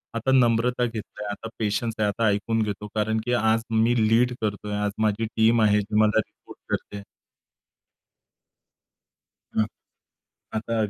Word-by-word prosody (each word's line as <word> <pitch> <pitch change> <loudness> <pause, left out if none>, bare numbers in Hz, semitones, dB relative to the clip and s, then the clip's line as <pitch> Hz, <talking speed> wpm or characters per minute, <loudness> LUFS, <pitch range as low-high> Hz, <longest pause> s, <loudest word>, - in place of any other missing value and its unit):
आता 115 +3 0
नम्रता 125 -1 +3
घेतलंय, 110 -2 -6
आता 115 +2 -7
पेशन्स 110 +1 -1
आहे, 105 - +2
आता 110 +2 0
ऐकून 110 +2 +1
घेतो, 105 0 -4
कारण 110 +1 +1
की 125 - 0
आज 110 -1 +2
मी 115 +2 +3
लीड 120 +2 +3
करतोय. 105 -1 -3
आज 105 0 0
माझी 110 +1 +1
टीम 115 +1 +2
आहे 105 -1 +4
मला 105 0 +3
रिपोर्ट - - -8
करते. 100 0 -4 2.5
हं. 110 - +4 0.9
आता 115 +1 -2
110 Hz, 130 wpm, -25 LUFS, 105-115 Hz, 2.5 s, आहे